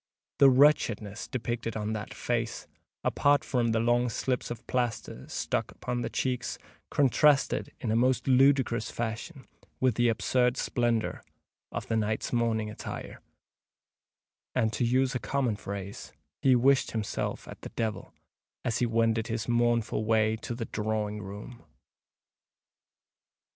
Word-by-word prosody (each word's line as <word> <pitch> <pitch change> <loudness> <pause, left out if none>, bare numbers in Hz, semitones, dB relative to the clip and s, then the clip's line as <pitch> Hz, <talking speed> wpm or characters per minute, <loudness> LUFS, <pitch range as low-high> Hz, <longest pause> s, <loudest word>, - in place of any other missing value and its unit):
The 140 - +8
wretchedness 125 -6 +3
depicted 120 -3 -3
on 105 0 -2
that 110 0 -5
face, 115 -1 -2 0.4
apart 145 0 +3
from 120 -3 0
the 115 0 +2
long 120 +1 +2
slips 125 +2 -2
of 120 -1 -7
plaster 120 - -2
stuck - - -1
upon 125 -1 -4
the - - -2
cheeks, 125 -2 -2 0.3
contrasted 145 +1 +3
in 115 - -2
a - - +2
most 125 +2 +2
ludicrous 130 -3 +4
fashion 120 +6 -5 0.3
with 130 -2 +3
the 120 +2 +3
absurd 125 +3 +2
splendour 120 -2 0 0.5
of - - -4
the 115 - -1
knight's 110 +1 -1
morning 115 -2 +1
attire; 105 - -7 1.3
and, 110 -3 +2
to 120 - 0
use 130 +2 +2
a 130 - -1
common 130 -5 0
phrase, 100 -1 -7 0.3
he 130 -2 +5
wished 135 +2 +3
himself 110 -2 -3
at - - -10
the - - -7
devil, 110 -2 -3 0.5
as 120 - 0
he 120 - +2
wended 115 0 +1
his 115 -1 -3
mournful 120 -2 +1
way 110 0 +2
to 120 +2 -5
the 115 -1 -4
drawing 105 -1 -2
room. 105 +5 -9
120 Hz, 140 wpm, -29 LUFS, 110-125 Hz, 1.3 s, The